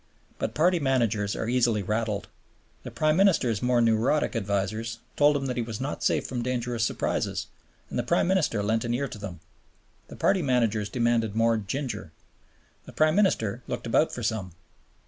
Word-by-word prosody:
But - - -3
party 175 +3 +3
managers 115 -7 +1
are 110 - -3
easily 120 -4 +2
"rattled." 105 0 -2 0.5
The - - -7
Prime 155 0 +1
Minister's 150 - +3
more 125 -1 +2
neurotic 115 +6 +2
advisers 110 +2 -2 0.2
told 145 0 +4
him 135 - -3
that 125 -2 -3
he - - +1
was 115 -2 -5
not 135 +3 -4
safe - - +1
from 125 -2 -3
dangerous 120 -1 -2
surprises, - - -1 0.4
and - - -3
the - - +3
Prime - - +1
Minister 165 - +1
lent 110 +2 +1
an 120 0 -1
ear 140 +3 -1
to 110 - -9
them. 90 -5 -7 0.7
The - - -10
party 195 -1 +2
managers 115 -7 +1
demanded 115 -3 +1
more 115 0 +3
"ginger." 125 +6 -4 0.8
The - - -10
Prime 155 0 +3
Minister 125 - +1
looked - - -4
about 120 +7 +2
for 120 - -6
some. 105 -6 -2
115 Hz, 175 wpm, -27 LUFS, 110-135 Hz, 0.8 s, told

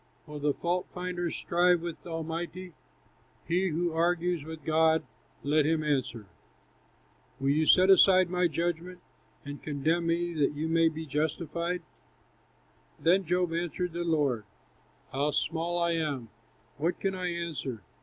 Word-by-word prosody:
"Will 150 0 -8
the 145 0 +2
fault 175 +1 -1
finder 180 -1 -2
strive 175 +1 +2
with 170 0 -7
Almighty? 170 +2 -5 0.7
He 180 +3 +2
who 170 0 -1
argues 170 0 +1
with 160 +1 -8
God, 160 0 +3 0.4
let 150 +2 +3
him 155 +1 +1
answer. 130 -7 -1 1.1
Will 135 +1 +1
you 155 +2 +2
set 185 0 +6
aside 185 -1 +6
my 180 0 +2
judgment, 170 +3 -3 0.5
And 145 0 -7
condemn 160 +4 0
me, 170 +1 0
that 150 -2 +1
you 155 +2 -2
may 165 0 +4
be 160 0 -6
justified?" 165 +4 -2 1.2
Then 185 +3 +3
Job 180 0 +1
answered 175 +1 -2
the 175 0 -2
Lord: 145 -9 +1 0.7
"How 140 +2 0
small 165 +4 -1
I 170 0 +2
am! 145 -8 -2 0.5
what 165 +5 -1
can 195 -1 -1
I 185 -1 -3
answer? 155 - -4
165 Hz, 140 wpm, -29 LUFS, 155-175 Hz, 1.2 s, set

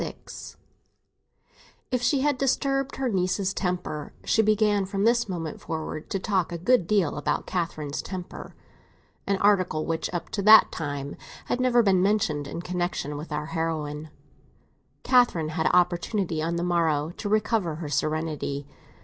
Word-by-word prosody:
XXVI - - -8 1.4
IF 250 -1 0
she 260 +3 +2
had 285 -2 +1
disturbed 275 0 0
her 265 -1 -1
niece's 190 -1 0
temper—she 180 +1 -1
began 210 -1 +2
from 195 +1 -2
this 235 0 +3
moment 165 -4 -4
forward 155 -1 -5
to - - -1
talk 190 -2 0
a 170 - -3
good 180 +1 +2
deal 200 -8 +1
about 150 0 -1
Catherine's 155 -5 -3
temper, 185 -1 -8 0.7
an 200 0 +2
article 185 -6 +2
which 165 -1 -2
up 175 -2 -4
to 200 - -2
that 215 +2 +8
time 145 -2 -4 0.3
had 245 - -1
never 245 -2 +4
been 190 -3 +3
mentioned 185 -8 +1
in 170 +4 -6
connexion 175 -5 -2
with 150 +2 -7
our 150 0 -2
heroine—Catherine 160 - -2
had 160 0 0
opportunity, 175 -1 +1
on 165 +2 -1
the 170 - -1
morrow, 165 -3 +1
to 205 - -4
recover 210 -5 +1
her 160 -1 -6
serenity. 150 -1 -2
180 Hz, 145 wpm, -26 LUFS, 155-210 Hz, 1.4 s, that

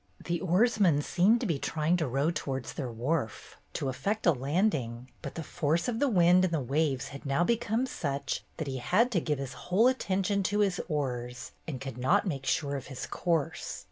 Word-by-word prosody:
The 170 -1 -1
oarsman 185 -4 +3
seemed 195 +9 +3
to - - -1
be 165 -9 0
trying 155 +4 +1
to 160 -4 0
row 135 +6 +1
towards 135 -5 -4
their 130 -5 -4
wharf, 120 +1 -3 0.2
to - - -2
effect 200 +11 -2
a 175 - +7
landing, 135 - -1
but - - -7
the 165 - -4
force 155 +3 0
of 235 -2 -1
the 285 - +3
wind 180 -3 +5
and 185 - +1
the 160 - +1
waves 140 +1 0
had 140 -1 -9
now 140 +4 +1
become 230 +3 +1
such 140 - -3
that 160 - -3
he 135 -2 -3
had 210 - +2
to 180 -7 +2
give 150 -2 -1
his 135 -1 -5 0.2
whole 195 +6 +4
attention 200 -5 +1
to 205 +2 +1
his 195 -3 +1
oars 125 -6 -3 0.2
and 140 -6 -4
could 135 -2 -6
not 130 +9 +3
make 140 -8 -3
sure 140 -2 0
of 135 - -6
his 135 -2 -5
course. 165 -5 -2
160 Hz, 205 wpm, -29 LUFS, 135-185 Hz, 0.2 s, a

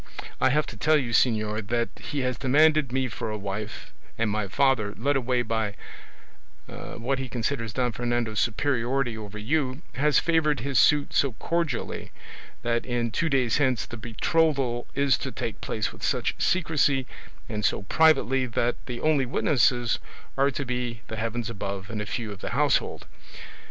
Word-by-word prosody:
I - - +5
have 150 +3 +2
to - - -9
tell 155 +7 +4
you, 125 -5 -2
señor, 110 -3 +1
that 120 +1 0
he 145 - -3
has 125 -1 0
demanded 150 +2 +3
me 130 0 0
for 115 -1 -5
a 105 - -3
wife, 100 +1 -6 0.2
and 115 -2 +1
my 105 -1 -1
father, 110 -1 +2
led 140 +5 +1
away 125 -1 +1
by 110 -2 -1 0.9
what 130 +3 -4
he 130 -1 -4
considers 115 -1 -2
Don 125 +2 0
Fernando's 120 -2 -1
superiority 120 0 0
over 105 -1 -7
you, 130 +5 -1
has 145 +1 +2
favoured 155 -6 +2
his 135 +1 +1
suit 145 -1 +4
so 140 -3 +2
cordially, 165 0 -2 0.5
that 120 0 0
in 120 -2 -1
two 165 +8 0
days 130 -5 +2
hence 130 -6 +1
the - - -8
betrothal 125 +2 0
is 140 -1 +3
to - - -4
take - - -5
place - - -2
with - - -15
such - - 0
secrecy 150 -6 +2 0.4
and 105 0 -4
so 100 - +1
privately 135 0 +3
that 120 +1 0
the 120 -2 -5
only 150 -4 +2
witnesses 120 -2 +2 0.4
are 135 +1 +3
to 140 0 -4
be 125 -2 -3
the 110 - -4
Heavens 115 +1 -2
above 100 -2 -5
and 110 -2 -3
a 105 - -5
few 110 -2 -3
of 100 -1 -9
the - - -3
household. - - +1
125 Hz, 170 wpm, -26 LUFS, 110-140 Hz, 0.9 s, I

